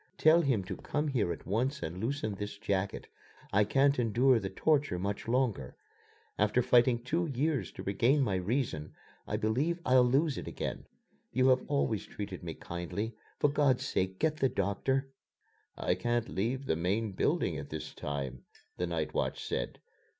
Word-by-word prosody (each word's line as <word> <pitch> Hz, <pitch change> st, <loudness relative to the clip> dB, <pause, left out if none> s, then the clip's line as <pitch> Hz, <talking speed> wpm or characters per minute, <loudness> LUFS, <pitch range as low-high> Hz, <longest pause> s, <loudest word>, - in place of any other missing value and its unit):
"Tell 160 Hz, +2 st, +6 dB
him 130 Hz, -, +1 dB
to 95 Hz, 0 st, -5 dB
come 150 Hz, +1 st, -2 dB
here 115 Hz, -10 st, +1 dB
at 85 Hz, -, -6 dB
once 130 Hz, +8 st, -1 dB
and 85 Hz, +3 st, -4 dB
loosen 115 Hz, -1 st, -1 dB
this 105 Hz, +1 st, -5 dB
jacket. 100 Hz, -2 st, -2 dB, 0.5 s
I 100 Hz, +2 st, +5 dB
can't 140 Hz, +5 st, +3 dB
endure 120 Hz, +2 st, +4 dB
the 95 Hz, -, -4 dB
torture 145 Hz, -, +1 dB
much 100 Hz, +3 st, -3 dB
longer. 115 Hz, -, 0 dB, 0.6 s
After 105 Hz, +4 st, +3 dB
fighting 120 Hz, -1 st, +4 dB
two 165 Hz, +7 st, 0 dB
years 145 Hz, +1 st, -1 dB
to -, -, -7 dB
regain 120 Hz, +9 st, +3 dB
my 105 Hz, -, 0 dB
reason, 90 Hz, -, -2 dB, 0.3 s
I -, -, -1 dB
believe 140 Hz, +11 st, 0 dB
I'll 130 Hz, 0 st, +6 dB
lose 135 Hz, +4 st, +2 dB
it -, -, -8 dB
again. -, -, -4 dB, 0.4 s
You 130 Hz, +2 st, +4 dB
have 130 Hz, 0 st, +4 dB
always 140 Hz, -7 st, 0 dB
treated 100 Hz, -3 st, -6 dB
me 80 Hz, -2 st, -6 dB
kindly. 90 Hz, +6 st, -4 dB, 0.2 s
For 145 Hz, -, +3 dB
God's 140 Hz, -4 st, +2 dB
sake, 95 Hz, 0 st, -1 dB
get 155 Hz, +4 st, +1 dB
the 135 Hz, -3 st, +2 dB
doctor!" 130 Hz, +7 st, 0 dB, 0.7 s
"I -, -, +1 dB
can't 120 Hz, -1 st, -1 dB
leave 125 Hz, +8 st, -1 dB
the 80 Hz, -, +1 dB
main 100 Hz, +6 st, 0 dB
building 95 Hz, -, 0 dB
at 70 Hz, -, -8 dB
this 75 Hz, 0 st, -6 dB
time," 70 Hz, -3 st, -4 dB, 0.3 s
the 90 Hz, -, -1 dB
night 80 Hz, -2 st, -2 dB
watch -, -, -1 dB
said. -, -, -3 dB
115 Hz, 170 wpm, -31 LUFS, 95-135 Hz, 0.7 s, Tell